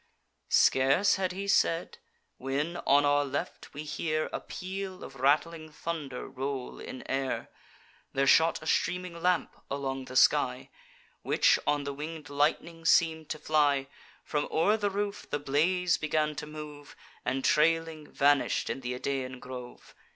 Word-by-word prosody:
Scarce 135 Hz, +11 st, +4 dB
had 185 Hz, -1 st, -1 dB
he 195 Hz, +2 st, -5 dB
said, 170 Hz, -4 st, +1 dB, 0.4 s
when, 145 Hz, +6 st, -2 dB
on 145 Hz, +1 st, +5 dB
our 145 Hz, 0 st, +3 dB
left, 140 Hz, -, -5 dB
we 150 Hz, -, -5 dB
hear 155 Hz, +1 st, -2 dB
A -, -, -1 dB
peal 190 Hz, 0 st, -6 dB
of 135 Hz, -, -10 dB
rattling 155 Hz, +4 st, +1 dB
thunder 150 Hz, -5 st, -5 dB
roll 135 Hz, -1 st, -5 dB
in 130 Hz, -, -8 dB
air: 135 Hz, 0 st, -2 dB, 0.6 s
There 135 Hz, 0 st, +1 dB
shot 160 Hz, +3 st, +4 dB
a -, -, -9 dB
streaming 180 Hz, +1 st, -1 dB
lamp 180 Hz, 0 st, +1 dB
along 135 Hz, -1 st, -3 dB
the 130 Hz, -, -9 dB
sky, -, -, +3 dB, 0.5 s
Which -, -, +3 dB
on 145 Hz, -1 st, +2 dB
the 140 Hz, 0 st, -4 dB
winged 150 Hz, +1 st, -7 dB
lightning 160 Hz, +3 st, 0 dB
seem'd 160 Hz, -2 st, +3 dB
to 155 Hz, -, -3 dB
fly; 145 Hz, -3 st, +2 dB, 0.4 s
From 150 Hz, -1 st, -1 dB
o'er 195 Hz, +7 st, +3 dB
the 205 Hz, -2 st, 0 dB
roof 200 Hz, +1 st, -3 dB
the -, -, 0 dB
blaze 165 Hz, +6 st, +1 dB
began 155 Hz, 0 st, 0 dB
to 150 Hz, -, -5 dB
move, 150 Hz, -1 st, -9 dB, 0.3 s
And, 130 Hz, +1 st, -1 dB
trailing, 160 Hz, 0 st, +2 dB
vanish'd 145 Hz, 0 st, +2 dB
in 135 Hz, -, -5 dB
th' -, -, -16 dB
Idaean 130 Hz, -1 st, -3 dB
grove. 125 Hz, -1 st, -10 dB
150 Hz, 150 wpm, -29 LUFS, 140-165 Hz, 0.6 s, on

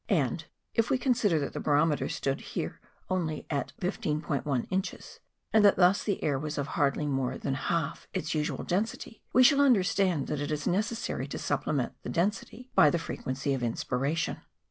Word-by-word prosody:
And -, -, +1 dB, 0.3 s
if 230 Hz, 0 st, +2 dB
we 270 Hz, -, +3 dB
consider 240 Hz, -, +2 dB
that 140 Hz, -2 st, -2 dB
the -, -, -4 dB
barometer 150 Hz, +1 st, +2 dB
stood 135 Hz, 0 st, -2 dB
there -, -, -3 dB, 0.3 s
only 165 Hz, -5 st, -2 dB
at 140 Hz, -2 st, -1 dB
15*1 150 Hz, -, -1 dB
inches, 190 Hz, +1 st, -3 dB, 0.3 s
and 220 Hz, -1 st, +6 dB
that 205 Hz, -, +7 dB
thus 185 Hz, +2 st, +4 dB
the 200 Hz, -, -2 dB
air 140 Hz, -3 st, +1 dB
was 150 Hz, +1 st, -4 dB
of 145 Hz, -1 st, -2 dB
hardly 145 Hz, +1 st, +1 dB
more 135 Hz, -3 st, -1 dB
than 135 Hz, -, -2 dB
half 165 Hz, +2 st, -2 dB
its 155 Hz, -, -2 dB
usual 150 Hz, -1 st, -1 dB
density, 215 Hz, +4 st, -2 dB
we 255 Hz, -, +6 dB
shall 280 Hz, +2 st, +6 dB
understand 190 Hz, -, +3 dB
that 150 Hz, -, -3 dB
it 145 Hz, -, -2 dB
is 150 Hz, -1 st, -2 dB
necessary 215 Hz, +5 st, -1 dB
to -, -, -5 dB
supplement -, -, -1 dB
the -, -, -6 dB
density 210 Hz, +7 st, -2 dB
by 150 Hz, -, +7 dB
the 170 Hz, -, +1 dB
frequency 135 Hz, -4 st, -3 dB
of 135 Hz, -, -2 dB
inspiration. 135 Hz, +7 st, -1 dB
160 Hz, 175 wpm, -29 LUFS, 145-200 Hz, 0.3 s, that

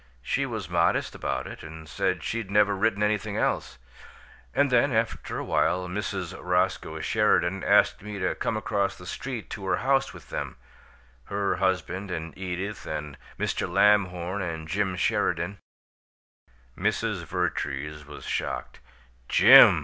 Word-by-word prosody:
She 135 Hz, -, 0 dB
was 110 Hz, -8 st, -4 dB
modest 85 Hz, 0 st, +1 dB
about -, -, -3 dB
it, -, -, -8 dB
and 80 Hz, 0 st, -10 dB
said -, -, -1 dB
she'd 115 Hz, -4 st, -3 dB
never 105 Hz, 0 st, +4 dB
written 100 Hz, +1 st, +1 dB
anything 105 Hz, 0 st, 0 dB
else. -, -, -1 dB, 0.7 s
And 140 Hz, -1 st, +2 dB
then, 125 Hz, +3 st, +4 dB
after 115 Hz, -1 st, -1 dB
a -, -, -3 dB
while, 90 Hz, 0 st, +1 dB
Mrs. 95 Hz, -2 st, -3 dB
Roscoe 90 Hz, 0 st, 0 dB
Sheridan 90 Hz, +3 st, +2 dB
asked 100 Hz, 0 st, +4 dB
me 105 Hz, 0 st, -6 dB
to 95 Hz, -1 st, 0 dB
come 110 Hz, -, -2 dB
across 100 Hz, -2 st, -1 dB
the 90 Hz, -, -12 dB
street 120 Hz, +5 st, -5 dB
to 100 Hz, -, -6 dB
her -, -, +3 dB
house 135 Hz, +1 st, +1 dB
with -, -, -14 dB
them -, -, -4 dB, 0.7 s
her 100 Hz, 0 st, -1 dB
husband 95 Hz, +1 st, -1 dB
and 80 Hz, -2 st, -5 dB
Edith 95 Hz, +2 st, -4 dB
and 75 Hz, -2 st, -4 dB, 0.2 s
Mr. -, -, -1 dB
Lamhorn 95 Hz, -1 st, +3 dB
and 80 Hz, -3 st, -4 dB
Jim 95 Hz, +2 st, 0 dB
Sheridan 90 Hz, +1 st, 0 dB, 0.6 s
" -, -, -, 0.3 s
Mrs. 105 Hz, -1 st, -1 dB
Vertrees 75 Hz, -4 st, -2 dB
was 75 Hz, 0 st, -11 dB
shocked. -, -, -3 dB, 0.5 s
"'Jim'!" -, -, +9 dB
95 Hz, 145 wpm, -27 LUFS, 85-105 Hz, 0.7 s, Jim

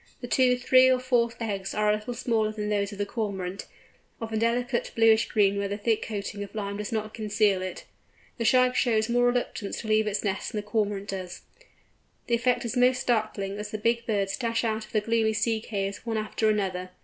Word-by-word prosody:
The 245 Hz, -, -6 dB
two, 250 Hz, 0 st, +3 dB
three, 255 Hz, +1 st, +5 dB
or 255 Hz, -1 st, +3 dB
four 245 Hz, -2 st, +2 dB
eggs 200 Hz, -4 st, -3 dB
are 210 Hz, 0 st, +3 dB
a -, -, +3 dB
little 215 Hz, +3 st, -4 dB
smaller 225 Hz, -3 st, 0 dB
than 210 Hz, -1 st, -4 dB
those 200 Hz, -1 st, 0 dB
of 205 Hz, -, -8 dB
the 205 Hz, -, -1 dB
Cormorant, 195 Hz, -4 st, -4 dB, 0.5 s
of 225 Hz, -1 st, -5 dB
a -, -, 0 dB
delicate 240 Hz, +2 st, 0 dB
bluish 225 Hz, 0 st, +5 dB
green 200 Hz, -2 st, +2 dB
where 200 Hz, -, -1 dB
the 200 Hz, +1 st, -3 dB
thick 220 Hz, +1 st, 0 dB
coating 205 Hz, -1 st, -4 dB
of 200 Hz, -, -11 dB
lime 200 Hz, -1 st, -3 dB
does 210 Hz, +3 st, -5 dB
not 215 Hz, -1 st, -3 dB
conceal 210 Hz, -3 st, +1 dB
it. 185 Hz, 0 st, -5 dB, 0.6 s
The -, -, 0 dB
Shag 255 Hz, +1 st, +4 dB
shows 225 Hz, -2 st, +2 dB
more 245 Hz, +1 st, +3 dB
reluctance 245 Hz, -4 st, -2 dB
to 220 Hz, -, -8 dB
leave 215 Hz, 0 st, +3 dB
its 205 Hz, -1 st, -1 dB
nest 200 Hz, -2 st, -2 dB
than 210 Hz, -, -1 dB
the -, -, -19 dB
Cormorant 205 Hz, -2 st, -1 dB
does. 185 Hz, -2 st, -5 dB, 0.8 s
The 235 Hz, -, -2 dB
effect 240 Hz, +1 st, +2 dB
is 235 Hz, -, -3 dB
most 250 Hz, +1 st, +4 dB
startling 215 Hz, -5 st, -1 dB
as 210 Hz, 0 st, -5 dB
the 215 Hz, -, -4 dB
big 235 Hz, +2 st, 0 dB
birds 200 Hz, -3 st, 0 dB
dash 230 Hz, -2 st, -1 dB
out 220 Hz, -1 st, -1 dB
of -, -, -20 dB
the 215 Hz, -, +1 dB
gloomy 225 Hz, 0 st, +1 dB
sea 220 Hz, +1 st, 0 dB
caves 200 Hz, -3 st, -4 dB
one 225 Hz, -2 st, -2 dB
after 215 Hz, 0 st, 0 dB
the 210 Hz, -1 st, +1 dB
other. 185 Hz, -1 st, -4 dB
215 Hz, 220 wpm, -27 LUFS, 205-235 Hz, 0.8 s, three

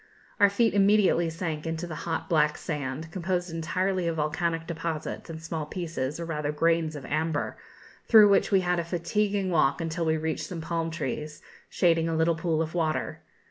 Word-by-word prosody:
Our 205 Hz, -1 st, +7 dB
feet 225 Hz, +3 st, +2 dB
immediately 200 Hz, -4 st, +4 dB
sank 160 Hz, -2 st, -4 dB
into 165 Hz, +1 st, -3 dB
the 170 Hz, -, -6 dB, 0.2 s
hot 160 Hz, -, -2 dB
black 150 Hz, -2 st, +2 dB
sand, 150 Hz, +1 st, -4 dB
composed 180 Hz, 0 st, -2 dB
entirely 185 Hz, +2 st, -1 dB
of 165 Hz, -, -1 dB
volcanic 165 Hz, +2 st, -1 dB
deposits 165 Hz, -1 st, -4 dB
and 160 Hz, -1 st, -6 dB
small 160 Hz, -2 st, -4 dB
pieces, 160 Hz, -4 st, -4 dB
or 170 Hz, -, -3 dB
rather 150 Hz, -3 st, -2 dB
grains, 165 Hz, 0 st, +1 dB
of 140 Hz, -, -7 dB
amber, 155 Hz, 0 st, -1 dB, 0.5 s
through 215 Hz, -3 st, +8 dB
which 200 Hz, -, +3 dB
we 195 Hz, -1 st, +5 dB
had 180 Hz, -1 st, +1 dB
a -, -, -1 dB
fatiguing 190 Hz, +3 st, -1 dB
walk 140 Hz, -4 st, +3 dB
until 165 Hz, +1 st, -2 dB
we 160 Hz, 0 st, +2 dB
reached 160 Hz, 0 st, -2 dB
some 175 Hz, -, -6 dB
palm 165 Hz, 0 st, -2 dB
trees, 150 Hz, -1 st, -5 dB, 0.3 s
shading 165 Hz, -2 st, +2 dB
a 165 Hz, -, -1 dB
little 160 Hz, +1 st, +3 dB
pool 160 Hz, -1 st, 0 dB
of 160 Hz, -, -6 dB
water. 160 Hz, -3 st, -1 dB
165 Hz, 180 wpm, -27 LUFS, 160-175 Hz, 0.5 s, through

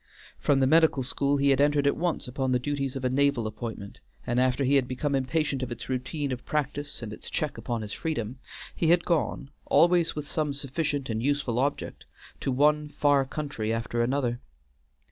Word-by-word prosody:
From 135 Hz, -2 st, +2 dB
the -, -, +5 dB
medical 155 Hz, -1 st, +4 dB
school 140 Hz, +2 st, +1 dB
he 140 Hz, 0 st, +3 dB
had 135 Hz, 0 st, +3 dB
entered 145 Hz, 0 st, +3 dB
at 140 Hz, -, +3 dB
once 170 Hz, -4 st, -1 dB
upon 130 Hz, +1 st, -1 dB
the 125 Hz, -, +4 dB
duties 140 Hz, +1 st, -2 dB
of 130 Hz, -1 st, -3 dB
a -, -, +3 dB
naval 140 Hz, -3 st, +2 dB
appointment, 110 Hz, -2 st, -6 dB, 0.3 s
and 120 Hz, -1 st, +1 dB
after 130 Hz, +2 st, +2 dB
he 135 Hz, +2 st, +2 dB
had 135 Hz, -3 st, +3 dB
become 135 Hz, +3 st, -2 dB
impatient 135 Hz, +1 st, 0 dB
of 130 Hz, -1 st, -4 dB
its 120 Hz, -, -6 dB
routine 135 Hz, +3 st, -2 dB
of 125 Hz, -1 st, -4 dB
practice 145 Hz, -2 st, -3 dB
and 105 Hz, -2 st, -5 dB
its -, -, -9 dB
check 150 Hz, -2 st, -2 dB
upon 120 Hz, -3 st, -3 dB
his 105 Hz, -, -6 dB
freedom, 130 Hz, -6 st, -3 dB, 0.4 s
he 165 Hz, -, 0 dB
had 170 Hz, +1 st, +4 dB
gone, 150 Hz, -4 st, -1 dB, 0.2 s
always 175 Hz, 0 st, +4 dB
with 150 Hz, -1 st, -5 dB
some 150 Hz, -2 st, -1 dB
sufficient 145 Hz, 0 st, -2 dB
and 110 Hz, 0 st, -2 dB
useful 135 Hz, -3 st, 0 dB
object, 140 Hz, +2 st, -2 dB, 0.3 s
to 135 Hz, -, -1 dB
one 150 Hz, +3 st, +3 dB
far 145 Hz, -2 st, +3 dB
country 135 Hz, -6 st, -3 dB
after 115 Hz, +1 st, -1 dB
another. 120 Hz, -1 st, 0 dB
140 Hz, 195 wpm, -27 LUFS, 125-145 Hz, 0.4 s, the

